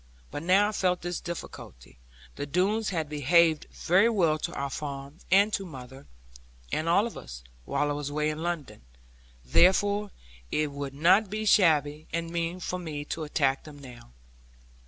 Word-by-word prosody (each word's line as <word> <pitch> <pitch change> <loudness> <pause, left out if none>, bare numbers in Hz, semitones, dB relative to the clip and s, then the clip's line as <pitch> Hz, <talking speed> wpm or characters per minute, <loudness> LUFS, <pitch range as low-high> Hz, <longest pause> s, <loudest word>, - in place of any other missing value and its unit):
But 145 - -5
now 190 +5 +4
I - - -3
felt 180 -4 0
this 175 0 -3
difficulty - - -9 0.4
the 145 - -5
Doones 195 +8 +1
had 165 -5 -2
behaved 155 +2 +3
very 190 +7 +3
well 170 -8 +2
to - - -3
our 140 0 -3
farm, 140 +2 -6
and 200 +3 +4
to 195 - 0
mother, 130 -5 -11 0.6
and 160 +2 -1
all 200 +5 +4
of 235 - -6
us, - - -9 0.2
while 145 +1 0
I - - 0
was 145 -1 -4
away 150 +1 0
in 155 +1 -6
London. 165 -11 -4 0.6
Therefore, 200 - +3 0.4
would 140 -2 -2
it - - -13
not 190 +6 +5
be 215 +2 -3
shabby, 155 -6 +3
and 165 0 -3
mean, 170 +1 -2
for 180 +1 -4
me 150 -4 -5
to 160 -1 -5
attack 135 -2 0
them 150 -2 -12
now? 125 - -13
160 Hz, 170 wpm, -28 LUFS, 145-185 Hz, 0.6 s, not